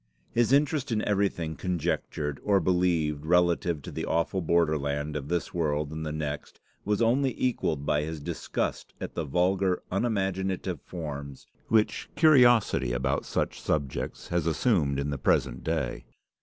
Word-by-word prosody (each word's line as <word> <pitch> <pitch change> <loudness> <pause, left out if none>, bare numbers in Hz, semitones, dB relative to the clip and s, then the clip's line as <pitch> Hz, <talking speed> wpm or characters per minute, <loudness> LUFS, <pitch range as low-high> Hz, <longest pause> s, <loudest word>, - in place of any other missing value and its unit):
His 120 +1 +2
interest 145 -1 +2
in 105 -2 0
everything 95 -6 0
conjectured 75 -4 -2
or 100 -1 +3
believed 85 -4 +1
relative 85 -2 +2
to - - -7
the - - -4
awful 85 +3 0
borderland 75 -3 +1
of 70 -2 -4
this 85 +1 -2
world 75 -3 -1
and 80 0 -5
the 75 - -3
next, 75 -1 -5 0.2
was 105 +3 +1
only 130 +3 +2
equalled 80 - 0
by 75 - +2
his 80 +1 -4
disgust 70 - -3
at - - -5
the 85 - -3
vulgar, 90 +5 +1
unimaginative 95 - -1
forms 70 -5 -7 0.2
which 110 -1 +1
curiosity 120 - +5
about 65 +3 0
such - - -2
subjects 70 -4 -2
has 85 -2 0
assumed 80 - +2
in 70 +1 -2
the 70 - -3
present - - +1
day. 70 -7 -2
85 Hz, 145 wpm, -28 LUFS, 75-95 Hz, 0.2 s, curiosity